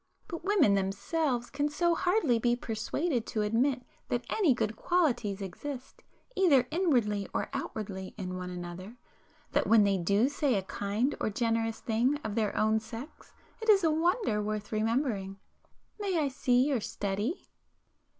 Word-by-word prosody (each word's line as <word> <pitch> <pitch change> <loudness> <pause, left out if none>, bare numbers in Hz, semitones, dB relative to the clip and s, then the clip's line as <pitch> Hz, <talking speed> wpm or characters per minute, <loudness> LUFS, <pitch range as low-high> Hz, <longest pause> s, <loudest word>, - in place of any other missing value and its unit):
But 335 -1 -6
women 375 - +4
themselves 240 - -1
can 290 +1 0
so 340 +3 +2
hardly 335 - +2
be 240 +1 +2
persuaded 240 +4 -2
to 215 -2 -1
admit 250 +5 +1 0.3
that 240 0 -1
any 380 -9 +3
good 220 -2 -1
qualities 240 - 0
exist 255 +8 -7 0.3
either 290 -10 +4
inwardly 240 - +1
or - - -1
outwardly 190 -3 -5
in 185 -3 -4
one 180 0 -5
another, 180 +5 -7 0.5
that - - +1
when 225 -2 +6
they 200 -2 +2
do 200 +7 +3
say 285 -3 +1
a 195 - 0
kind 205 +8 -1
or - - 0
generous 225 +1 -1
thing 240 +6 +1
of 215 - -3
their 215 -2 0
own 220 +1 +3
sex 230 +6 -10 0.3
it 445 - -2
is 395 -3 +6
a 320 - +4
wonder 330 - +1
worth 210 0 -3
remembering. 215 -3 -1 0.6
May 390 -4 0
I 290 -4 +1 0.2
your 250 0 +4
study?" 205 - -3
235 Hz, 150 wpm, -30 LUFS, 210-295 Hz, 0.6 s, when